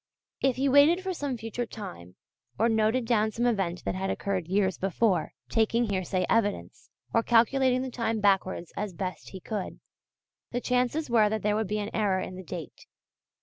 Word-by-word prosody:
If 265 -2 +2
he 270 +2 +1
waited 290 +7 +5
for 380 -1 -2
some 285 -6 -3
future 225 +2 -4
time, 180 - -9 0.4
or 225 - +3
noted 225 +2 +2
down 220 -2 +2
some 235 +3 -2
event 190 -7 0
that - - 0
had 190 +1 -2
occurred 190 -4 -2
years 190 -1 +1
before, 190 -2 +1
taking 225 0 +1
hearsay 185 -1 0
evidence, 215 -3 -1 0.2
or 230 - +4
calculating 250 +3 +3
the 260 - -5
time 230 -2 -1
backwards 190 -4 +1
as 205 -2 -3
best 185 +1 -5
he 190 - -8
could, 205 +1 -5 0.7
the 245 - -2
chances 250 +5 0
were 220 -3 +5
that 220 0 -2
there 210 0 +2
would 220 -1 0
be 210 - -1
an 210 0 -3
error 200 -4 +1
in 185 - -5
the 185 - -7
date. 170 -2 -8
215 Hz, 185 wpm, -28 LUFS, 190-240 Hz, 0.7 s, waited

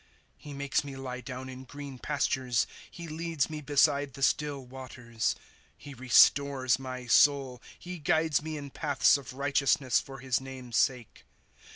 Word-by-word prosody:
* - - -39
He 145 - -7
makes 140 0 -1
me 140 -1 -8
lie 130 -1 -6
down 130 -1 -7
in 130 0 -9
green 140 0 -9
pastures; 130 -4 0 0.2
He 170 -1 -9
leads 160 -2 -2
me 155 -1 -5
beside 145 -1 +2
the 135 - -5
still 145 -2 0
waters. 125 -3 -4
^ - - -26 0.4
He 145 - -11
restores 130 0 +4
my 130 -1 -6
soul; 135 0 +3 0.2
He 180 0 -8
guides 160 0 +2
me 155 0 -5
in 140 -1 -8
paths 145 -2 +3
of 140 -3 -6
righteousness, 140 -1 +2
for 135 0 -10
his 130 -1 -1
name's 130 -3 -8
salce. 125 -4 0
135 Hz, 165 wpm, -29 LUFS, 130-145 Hz, 0.4 s, restores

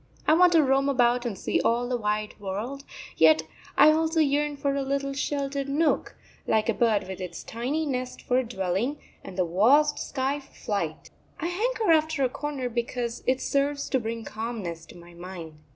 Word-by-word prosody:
I 310 - +6
want 355 +2 +6
to 320 -2 +6
roam 270 +1 +2
about 245 -2 +2
and 205 -5 -4
see - - 0
all 240 +1 +1
the 250 - -1
wide 210 -2 -1
world, 210 +8 -4 0.3
yet 160 0 +6 0.3
I 310 - +8
also 320 +1 +1
yearn 295 0 +1
for 280 0 0
a 280 - -1
little 275 0 -1
sheltered 280 0 -2
nook; 300 +2 +1 0.3
like 220 +1 +2
a - - +3
bird 215 -4 +1
with 190 0 -6
its 180 - -6
tiny 270 +8 -2
nest 255 -3 -3
for 250 0 +2
a - - 0
dwelling, 225 +4 -2 0.3
and 180 - -9
the 185 - +2
vast 255 - +4
sky 270 +1 -2
for 275 - -19
flight. 170 -7 -3 0.3
I 305 - -3
hanker 435 +2 0
after 315 -2 +2
a 255 - +2
corner 280 -1 -4
because 235 0 -3
it 260 0 +2
serves 280 0 0
to 265 - +3
bring 225 0 -4
calmness 210 -8 -5
to - - -13
my 175 0 -14
mind. 170 -3 -9
255 Hz, 190 wpm, -26 LUFS, 210-285 Hz, 0.3 s, I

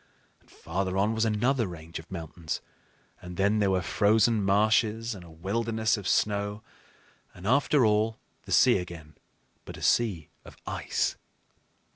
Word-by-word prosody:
And - - -29
farther 95 +2 -3
on 105 +3 +2
was 110 0 +1
another 115 +2 +1
range 85 -2 -8
of 80 - -14
mountains; 85 -2 -5 0.6
and 90 0 -9
then 100 +2 +2
there 100 -2 +2
were 95 -1 +1
frozen 110 +2 +3
marshes 110 +3 +2
and 95 -4 -10
a 85 - -14
wilderness 110 +7 -1
of 100 -4 -6
snow, 105 +1 0 0.7
and 90 - -11
after 140 +2 +3
all 110 +1 +2 0.3
the - - -10
sea - - +5
again, 85 -4 -9 0.5
but - - -9
a - - -9
sea 100 -10 +1
of - - -14
ice. - - -2
105 Hz, 150 wpm, -28 LUFS, 90-110 Hz, 0.7 s, sea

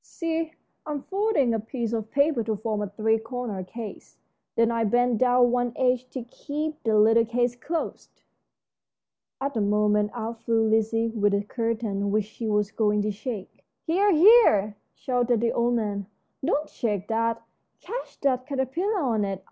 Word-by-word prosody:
See, 330 -1 -3 0.3
I'm 295 -2 -4
folding 390 - +1
a 225 - 0
piece 230 +1 -4
of 220 -1 -3
paper 280 -3 +2
to 220 -1 -1
form 215 0 -2
a 205 - -3
three 220 +2 +1
cornered 225 -5 -5
case. 225 0 -9 0.4
Then 230 0 +3
I 230 -1 0
bend 240 +1 +2
down 245 -1 +4
one 245 -1 0
edge 255 -1 +1
to 255 - -5
keep 300 +5 -5
the 220 -2 +2
little 225 +2 +5
case 240 +1 0
closed." 320 +6 -5 1.2
At 275 +1 -2
this 225 - 0
moment 210 0 +2
out 225 -1 -5
flew 225 -1 +2
Lizzie 225 +1 +1
with 205 -2 +1
a 200 - 0
curtain 220 -3 -2
which 210 0 +1
she 220 +2 -6
was 210 -1 +1
going 210 -2 +1
to 210 - 0
shake. 210 -1 -7 0.2
"Here, 390 +5 +3
here!" 320 - +6 0.2
shouted 245 -2 0
the 230 +1 +1
old 240 +1 +1
man, 205 -4 -2 0.4
"don't 300 +1 0
shake 210 -4 -3
that; 230 +1 0 0.4
catch - - -7
that 255 -2 +1
caterpillar 315 - -1
on 230 -7 +1
it. 195 -2 -3
230 Hz, 165 wpm, -26 LUFS, 215-260 Hz, 1.2 s, here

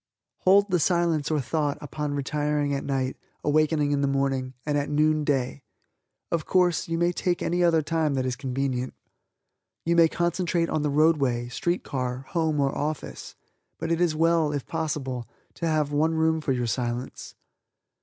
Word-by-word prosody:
Hold 200 +1 +4
the 180 - +3
Silence 170 -3 +1
or 155 -2 +1
thought 145 +2 -1
upon 150 0 -4
retiring 145 +1 0
at 140 - -2
night, 135 -1 -1 0.3
awakening 150 0 +2
in 140 -1 +1
the 140 - +2
morning, 135 -1 -1
and 150 -1 0
at 145 0 0
noon 155 +1 +2
day. 135 -2 -1 0.7
Of 165 -2 -1
course, 180 -3 +2
you 165 0 -1
may 175 +1 +2
take 175 0 -1
any 175 +1 +1
other 165 -2 +4
time 155 -2 0
that 130 -1 0
is 130 -1 -1
convenient. 130 -1 -2 0.9
You 170 +1 +2
may 165 -1 +7
concentrate 170 0 0
on 155 - 0
the 150 - 0
roadway, 140 -5 +2
street 175 +8 -1
car, 130 -1 -3
home 160 -3 0
or 135 -1 +1
office, 150 +1 -4 0.4
but 165 +1 -3
it 165 +1 +1
is 170 -3 +2
well, 165 -1 +3
if 145 -3 -3
possible, 135 -6 -3 0.3
to 170 - -3
have 155 -2 +1
one 155 +3 +2
room 160 0 +2
for 145 - -1
your 125 -2 0
Silence. 120 +2 -3
150 Hz, 175 wpm, -26 LUFS, 135-165 Hz, 0.9 s, may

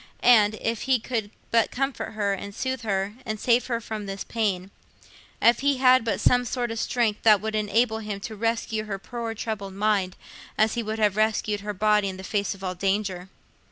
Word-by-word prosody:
Ah, 220 -4 +7
if 225 0 -2
he 260 - +5
could 225 -3 -3 0.2
but 230 -1 +3
comfort 270 -2 -3
her, 205 -2 0
and 200 +1 -6
soothe 260 -1 -2
her, 200 -2 -1
and 215 -3 -4
save 240 +2 +2
her 235 -2 -1
from 215 -2 -6
this 195 0 -4
pain; 200 -5 -2 0.7
if 235 - +5
he 280 0 +2
had 255 -1 +5
but 225 - -1
some 245 0 +4
sort 245 -1 -2
of 225 - -3
strength 225 -4 0
that 215 -2 +6
would 220 +2 -4
enable 220 +2 +1
him 210 -2 -5
to 220 +2 -6
rescue 225 0 -1
her 200 -2 -4
poor 230 +3 -5
troubled 205 -3 -5
mind, 200 -3 +1 0.4
as 220 0 +3
he 235 - -1
would 220 0 -3
have 210 -2 +2
rescued 215 -1 +1
her 205 +1 -4
body 210 0 +2
in 190 - -6
the 190 - -9
face 200 0 -1
of 195 - -14
all 185 -1 -2
danger! 190 -1 -1
215 Hz, 205 wpm, -25 LUFS, 200-230 Hz, 0.7 s, Ah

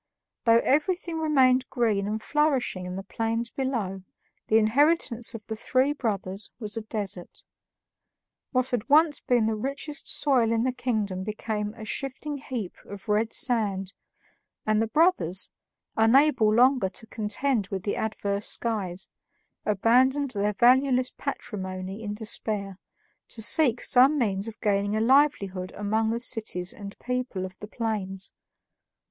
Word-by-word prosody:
Though 230 0 +5
everything 330 +3 0
remained 260 -4 +3
green 215 -5 0
and 215 +1 -3
flourishing 275 -11 0
in 180 - -5
the 195 - -5
plains 230 +3 -2
below, 230 -8 -3 0.5
the 220 - +4
inheritance 240 +1 +2
of 215 -2 -9
the 220 - -5
three 260 +5 +1
brothers 200 -6 -4
was 215 -2 -4
a 225 - -3
desert. 205 -4 -6 1.1
What 255 -1 +1
had 245 +1 -2
once 305 +1 +5
been 240 -3 +1
the 220 - +1
richest 275 +6 -4
soil 250 -6 +2
in 230 0 +1
the 260 - +1
kingdom 215 -7 -2
became 210 0 -4
a 220 - -9
shifting 275 +5 -4
heap 240 -9 -5
of 200 0 -10
red 215 +2 +1
sand, 200 -6 0 0.7
and 215 0 +2
the 225 - 0
brothers, 225 - +3 0.5
unable 230 0 +4
longer 250 -2 +4
to 225 - -6
contend 220 +1 -1
with 190 -1 -5
the 205 - -1
adverse 205 -1 -1
skies, 200 -6 -2 0.6
abandoned 255 +7 +3
their 205 -1 -1
valueless 255 +3 +3
patrimony 190 -6 -5
in 205 -1 -4
despair, 210 -3 -3 0.5
to 225 - -1
seek 245 0 +4
some 265 +4 +5
means 200 -5 0
of 225 - -9
gaining 205 0 +1
a - - +1
livelihood 220 -8 +2
among 220 +2 0
the 230 +1 -1
cities 215 -6 0
and 200 -1 -9
people 250 -7 -3
of 185 0 -9
the 210 - -8
plains. 205 -4 -4
225 Hz, 140 wpm, -26 LUFS, 205-255 Hz, 1.1 s, Though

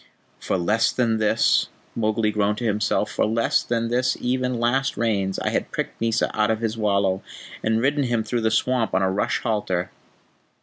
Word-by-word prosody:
"For - - -1
less 105 +6 +2
than 115 -3 +1
this," 110 -1 +3 0.3
Mowgli 110 -1 +1
groaned 105 0 0
to 120 - -5
himself, 105 -1 0
"for - - 0
less 115 +1 +1
than 115 -1 -1
this 125 +1 +1
even 125 -1 -1
last 130 +3 +1
Rains 100 -5 0
I - - -1
had - - -1
pricked - - -4
Mysa 115 -1 +1
out 105 0 +2
of 110 -1 +1
his 110 -1 -2
wallow, 100 -3 +1 0.4
and 110 0 +1
ridden 140 +1 +2
him 120 -2 0
through 120 +1 -2
the 110 - +2
swamp 115 -1 +1
on 95 - +2
a 95 - +2
rush 100 - -1
halter." 105 -6 -1
110 Hz, 185 wpm, -23 LUFS, 105-120 Hz, 0.4 s, this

